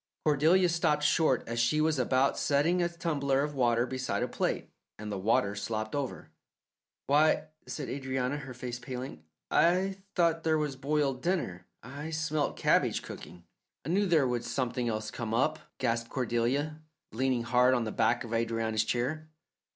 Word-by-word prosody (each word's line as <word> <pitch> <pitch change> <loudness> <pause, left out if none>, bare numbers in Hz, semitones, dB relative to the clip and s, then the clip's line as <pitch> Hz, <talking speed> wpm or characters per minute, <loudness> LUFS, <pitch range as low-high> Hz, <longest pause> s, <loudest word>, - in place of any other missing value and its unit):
Cordelia 160 +5 +4
stopped 160 -3 +1
short 150 -4 +3
as 115 0 -2
she 135 +7 +2
was 155 -2 +2
about 130 +2 +2
setting 155 +6 +2
a 175 - +1
tumbler 140 -5 0
of 150 0 -3
water 120 -3 +2
beside 130 0 -2
a - - 0
plate, - - -2 0.3
and 105 0 -6
the 100 - -2
water 100 0 +2
slopped 110 +1 -3
over. 140 -3 -4 0.7
"Why," 155 +2 +3 0.2
said 145 - -5
Adrianna, 130 0 -2
her 140 -4 -8
face 125 -1 -5
paling, 125 - -7 0.3
"I 185 +4 +3 0.2
thought 165 -2 +2
there 160 -1 +2
was 150 -3 -2
boiled 135 -1 0
dinner. 155 - -2 0.2
I 140 +6 -7
smelt 155 -2 -1
cabbage - - +2
cooking." 85 0 -10 0.4
"I - - -4
knew 200 +3 +2
there 160 -6 +4
would 120 -1 -1
something 125 -2 -1
else 110 -1 -3
come 115 -2 -3
up," 150 +6 +1 0.2
gasped 115 -2 -1
Cordelia, 130 +5 -1 0.3
leaning 125 +1 0
hard 125 +2 +4
on 120 - +1
the 110 - -3
back 115 +3 +1
of 115 - -8
Adrianna's 115 -1 0
chair. 140 +8 -2
130 Hz, 165 wpm, -30 LUFS, 120-155 Hz, 0.7 s, Cordelia